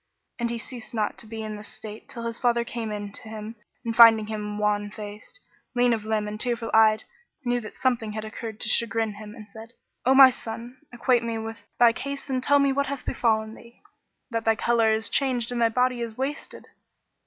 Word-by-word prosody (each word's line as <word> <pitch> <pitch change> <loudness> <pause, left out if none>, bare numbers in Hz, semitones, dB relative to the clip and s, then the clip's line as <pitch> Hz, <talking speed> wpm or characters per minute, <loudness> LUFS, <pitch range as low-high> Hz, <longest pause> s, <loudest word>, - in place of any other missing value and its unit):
[FN#10] - - -53
And 235 0 0
he 235 - -2
ceased 235 -1 -10
not 215 -2 0
to 230 - -7
be 220 0 -6
in 215 -1 -5
this 210 - -9
state 215 0 -10
till 235 -1 -6
his 230 0 -4
father 235 -1 +2
came 230 -2 -5
in 205 -1 -5
to 215 - -8
him 220 +1 -7 0.3
and 230 -1 -2
finding 225 -2 +8
him 210 -1 -4
wan 210 0 0
faced, 210 - -9 0.4
lean 245 0 +4
of 220 -2 -3
limb 215 -1 0
and 210 0 -5
tearful 235 -1 +1
eyed, 220 -1 +5 0.4
knew 245 0 +1
that 215 - -9
something 235 -5 0
had 215 0 -4
occurred 220 0 -7
to - - -2
chagrin 225 -1 +1
him 210 +1 -10
and 215 -3 -11
said, 220 +3 -12 0.3
"O 265 +1 +4
my 265 -1 +10
son, 235 +2 -8
acquaint 240 0 +2
me 230 -1 -2
with 225 0 -6 0.2
thy 235 -1 +6
case 280 +2 -5
and 255 -1 0
tell 285 +2 +4
me 280 -1 +3
what 280 +1 0
hath 280 -2 -5
befallen 220 -2 0
thee, 235 +1 -16 0.5
that 230 -1 -1
thy 225 0 +3
colour 225 0 +2
is 220 -1 +1
changed 245 -1 0
and 240 -1 -1
thy 230 - +5
body 250 +1 +1
is 230 -2 -5
wasted. 275 +3 -4
225 Hz, 220 wpm, -26 LUFS, 215-245 Hz, 0.5 s, my